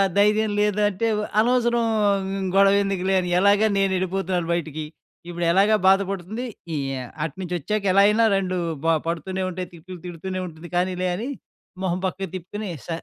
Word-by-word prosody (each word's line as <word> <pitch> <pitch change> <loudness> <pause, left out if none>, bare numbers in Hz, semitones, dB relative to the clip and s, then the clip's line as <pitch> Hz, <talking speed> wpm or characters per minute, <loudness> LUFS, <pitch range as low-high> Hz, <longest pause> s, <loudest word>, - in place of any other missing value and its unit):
ధైర్యం 210 +1 +3
లేదంటే, 210 0 +1
వ - - -1 0.2
అనవసరం 240 0 +2 0.4
హ్మ్, 195 0 -3
గొవెందుకులే 195 -1 +3
అని, 180 -1 -2
ఎలాగా 200 +3 +4
నేనెళ్ళిపోతున్నాను 190 -2 0
బయటకి. 155 -2 -3 0.4
ఇప్పుడెలాగా 175 +5 +3
బాధ 195 +1 +6
పడుతుంది, 195 +6 -4 0.3
ఈ - - -1 0.2
యా 130 - -4 0.2
అటునుంచొచ్చాక 180 +5 -3
ఎలా 195 +2 +5
అయినా 220 +2 +4
రెండూ 185 -1 -1 0.3
బ 165 - 0 0.2
పడుతూనే 185 +3 -2
ఉంటాయి, 180 -1 -5
తిట్లు 175 +2 -10
తిడుతూనే 185 +2 -5
ఉంటుంది, 165 +1 -11
కానీలే 180 +1 0
అని 230 +8 -4 0.5
మొహం 180 -1 0
పక్కకి 190 0 -5
తిప్పుకొనీ, 200 +3 -6 0.2
స - - -13
190 Hz, 145 wpm, -23 LUFS, 175-205 Hz, 0.5 s, బాధ